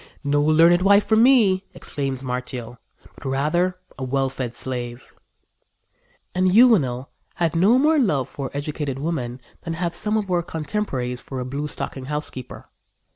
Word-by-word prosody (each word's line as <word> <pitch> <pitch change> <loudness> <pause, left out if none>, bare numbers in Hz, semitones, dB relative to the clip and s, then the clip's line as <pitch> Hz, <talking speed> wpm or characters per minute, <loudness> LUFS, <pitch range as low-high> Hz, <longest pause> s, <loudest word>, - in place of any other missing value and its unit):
"No 145 0 +2
learned 165 +4 +5
wife 200 +2 +5
for 220 - +3
me," 220 -5 +5
exclaims 135 -2 -4
Martial, 125 -2 -5 0.3
"but - - -15
rather 175 +7 +1 0.2
a - - -4
well 135 +1 0
fed 125 -3 -5
slave." 120 -1 -5 1.2
And 185 0 +2
Juvenal 170 - +4 0.2
had 170 -2 0
no 200 +9 +5
more 305 +3 +4
love 150 - +1
for 135 -2 -5
educated 145 -2 -3
women 135 -5 -3 0.2
than 165 - -4
have 170 0 -2
some 210 +5 -1
of 200 -3 -2
our 175 -1 +2
contemporaries 150 -7 -3
for 135 - -6
a 125 - -3
blue 140 +4 -3
stocking 135 -2 -5
housekeeper. 150 -3 -5
150 Hz, 150 wpm, -23 LUFS, 130-185 Hz, 1.2 s, learned